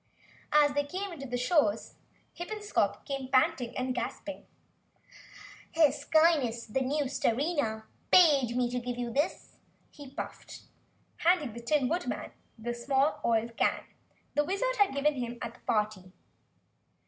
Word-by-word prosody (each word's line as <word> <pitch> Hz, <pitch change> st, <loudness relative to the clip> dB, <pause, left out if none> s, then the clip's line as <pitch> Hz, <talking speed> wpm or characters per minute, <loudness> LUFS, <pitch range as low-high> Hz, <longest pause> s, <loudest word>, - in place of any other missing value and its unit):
As 295 Hz, -1 st, +5 dB
they 290 Hz, 0 st, +1 dB
came 365 Hz, +2 st, -5 dB
to 275 Hz, -, -6 dB
the 245 Hz, 0 st, -2 dB
shores 250 Hz, -, +1 dB
of -, -, -27 dB, 0.4 s
Half 345 Hz, -, -6 dB
Moon 430 Hz, -, -4 dB
Lake, 420 Hz, -, -10 dB
Hippenscop 415 Hz, -, 0 dB
came 275 Hz, -2 st, -4 dB
panting 255 Hz, -2 st, +1 dB
and 255 Hz, 0 st, -1 dB
gasping 290 Hz, +3 st, -5 dB, 1.3 s
into -, -, -7 dB
view. -, -, +7 dB
"Her 285 Hz, -, +3 dB
Skyness 285 Hz, -6 st, +2 dB
the 265 Hz, -, +1 dB
new 290 Hz, +3 st, 0 dB
Starina, 255 Hz, -3 st, 0 dB, 0.3 s
bade 275 Hz, -9 st, +5 dB
me 250 Hz, -1 st, +2 dB
give 245 Hz, 0 st, -4 dB
you 240 Hz, -1 st, -3 dB
this," 290 Hz, +6 st, -2 dB, 0.3 s
he 285 Hz, -2 st, -11 dB
puffed, -, -, -8 dB, 0.6 s
handing 330 Hz, -9 st, +2 dB
the 235 Hz, -, -7 dB
Tin 265 Hz, +2 st, +1 dB
Woodman 350 Hz, +5 st, -3 dB, 0.3 s
the 240 Hz, +2 st, -4 dB
small 270 Hz, +5 st, +1 dB
oil 230 Hz, 0 st, +2 dB
can 230 Hz, -, 0 dB, 0.5 s
the 295 Hz, -, +2 dB
Wizard 400 Hz, +10 st, -1 dB
had 400 Hz, -9 st, +3 dB
given 295 Hz, +2 st, +2 dB
him 240 Hz, -3 st, -4 dB
at 235 Hz, 0 st, -5 dB
the -, -, -19 dB
party. 210 Hz, -4 st, -1 dB
275 Hz, 160 wpm, -30 LUFS, 240-300 Hz, 1.3 s, view